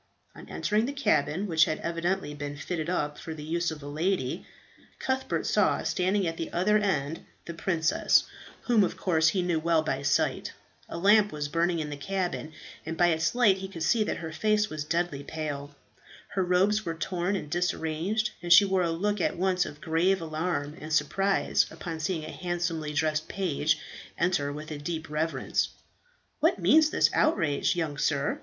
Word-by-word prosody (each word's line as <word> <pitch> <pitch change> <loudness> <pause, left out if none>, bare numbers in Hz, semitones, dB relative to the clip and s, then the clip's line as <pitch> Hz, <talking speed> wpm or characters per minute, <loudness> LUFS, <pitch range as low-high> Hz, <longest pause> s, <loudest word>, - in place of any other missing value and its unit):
On - - -13
entering 215 +3 0
the 280 - -3
cabin, 195 - +1
which 160 -4 +4
had 155 - -2
evidently 170 -1 -2
been 145 0 -6
fitted 160 +2 -3
up 150 -5 -1
for 160 - -6
the 150 - -8
use 170 +2 -1
of 155 -2 -7
a - - -7
lady, 160 0 -1 0.5
Cuthbert 260 0 -1
saw - - +2
standing 190 +2 +1
at 165 -1 -2
the 165 - -4
other 210 +5 +3
end 160 -6 -1 0.2
the 170 - -6
princess 165 -1 +2 0.4
whom 230 -4 +3
of - - -2
course 160 -4 +2
he 180 +2 +2
knew 175 -2 +1
well 165 0 +2
by 135 -3 -2
sight. 140 -1 0 0.4
A - - -5
lamp 205 +3 +5
was 150 -1 -4
burning 170 +2 +1
in 150 -2 -3
the 145 - -5
cabin, 180 0 -3 0.3
and 160 +1 -5
by 175 0 +4
its 160 +5 0
light 215 -6 +4
he 190 - -5
could 170 -4 -6
see 220 +6 +3
that - - -2
her 160 -1 -6
face 210 +5 +1
was 155 -1 -3
deadly 165 -3 -1
pale. 145 -2 -5 0.5
Her 190 - 0
robes 190 +4 +2
were 165 -3 -3
torn 180 +3 -1
and 185 - -4
disarranged, 175 +5 -1
and 175 0 -4
she 185 +4 +9
wore 190 -1 +1
a 170 - +1
look 200 +4 -1
at - - 0
once 185 0 +1
of 145 - -10
grave 175 +4 +2
alarm 155 -2 -3
and 155 +1 -7
surprise 195 +5 +2
upon 165 -3 -6
seeing 160 0 -2
a 155 - -7
handsomely 170 -3 -3
dressed 155 +1 0
page 160 -5 0 0.4
enter 170 -5 +1
with 155 +2 -7
a 150 - -5
deep 160 +1 -5
reverence. 160 +2 -1 0.7
"What - - +3
means 315 -1 +5
this - - +3
outrage, 165 - +2
young 155 -5 -2
sir? 145 -2 0
170 Hz, 185 wpm, -28 LUFS, 155-190 Hz, 0.7 s, she